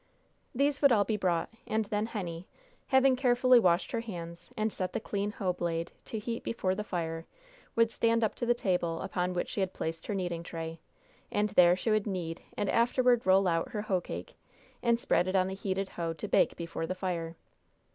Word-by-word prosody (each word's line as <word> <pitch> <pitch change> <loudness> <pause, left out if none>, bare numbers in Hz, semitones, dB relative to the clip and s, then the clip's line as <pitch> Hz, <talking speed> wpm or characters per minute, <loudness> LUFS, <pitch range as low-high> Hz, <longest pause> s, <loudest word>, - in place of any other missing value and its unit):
These 280 +2 +1
would 280 -2 +6
all 210 -4 +5
be 215 +2 -1
brought, 180 -5 0 0.2
and 220 0 0
then 210 +1 -1
Henny, 180 -6 -5 0.4
having 265 -1 +5
carefully 250 -1 +5
washed 180 -4 +2
her 230 - 0
hands, 170 -6 -7
and 215 0 0
set 185 -1 -3
the - - 0
clean 205 -1 -2
hoe 185 -5 -1
blade 170 -1 -2
to 225 - -5
heat 230 +2 -3
before 190 -5 -1
the 210 +2 -3
fire, 165 -4 -3 0.5
would 230 0 +4
stand 230 0 +2
up 220 - +1
to 240 - -2
the 240 - +4
table 180 -6 0
upon 180 0 -1
which 175 - -1
she - - -4
had 190 -1 0
placed 160 0 -4
her 210 - -1
kneading 175 -3 -2
tray, 165 -1 -6 0.5
and 210 +1 +1
there 180 -3 +6
she 205 +4 -1
would 215 0 +2
knead 175 -4 -3 0.2
and 205 - 0
afterward 240 +1 +3
roll 190 0 +5
out 165 -1 0
her 210 - -2
hoe 190 -4 0
cake, - - -7 0.5
and 235 -1 +2
spread 180 - +2
it 185 - -1
on 185 -1 +4
the 190 - -3
heated 195 0 -2
hoe 165 -1 -3
to 160 - -6
bake - - +3
before 165 -1 -4
the 185 - -2
fire. 170 -3 -3
190 Hz, 205 wpm, -30 LUFS, 175-225 Hz, 0.5 s, would